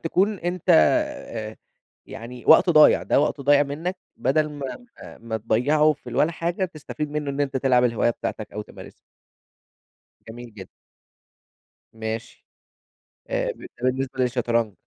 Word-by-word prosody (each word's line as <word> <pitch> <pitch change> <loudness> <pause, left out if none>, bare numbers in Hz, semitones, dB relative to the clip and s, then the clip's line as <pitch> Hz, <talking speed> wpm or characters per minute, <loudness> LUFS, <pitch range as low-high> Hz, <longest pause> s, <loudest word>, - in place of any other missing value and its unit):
تكون 195 +5 0
أنت 175 0 -4
آآ 175 - +1 0.5
يعني 120 +2 -9
وقت 160 +3 +7
ضايع، 155 -2 +6
ده - - +2
وقت 145 0 -1
ضايع 145 +1 +4
منَّك 160 +6 -4 0.2
بدل 150 +2 +1
ما 145 - -7 0.2
ما - - -12
ما 115 -1 -4
تضيعه 140 +8 +2
في 150 - -12
الولا 160 +3 +1
حاجة، 170 +3 -2
تستفيد 155 -3 -6
منه 150 -1 -3
إن 140 +1 -4
أنت 135 -2 -1
تلعب 125 -2 +3
الهواية 120 0 +2
بتاعتَك 110 -2 -5
أو 105 - -5
تمارسها. - - -13 1.4
جميل 120 0 -10
جد 95 -3 -10 1.2
ماشي. 110 0 -6 0.9
آآ - - 0
ب - - -21
ده - - -9
بالنسبة 130 +1 -1
للشطرنج. 120 -4 0
140 Hz, 140 wpm, -23 LUFS, 120-160 Hz, 1.4 s, وقت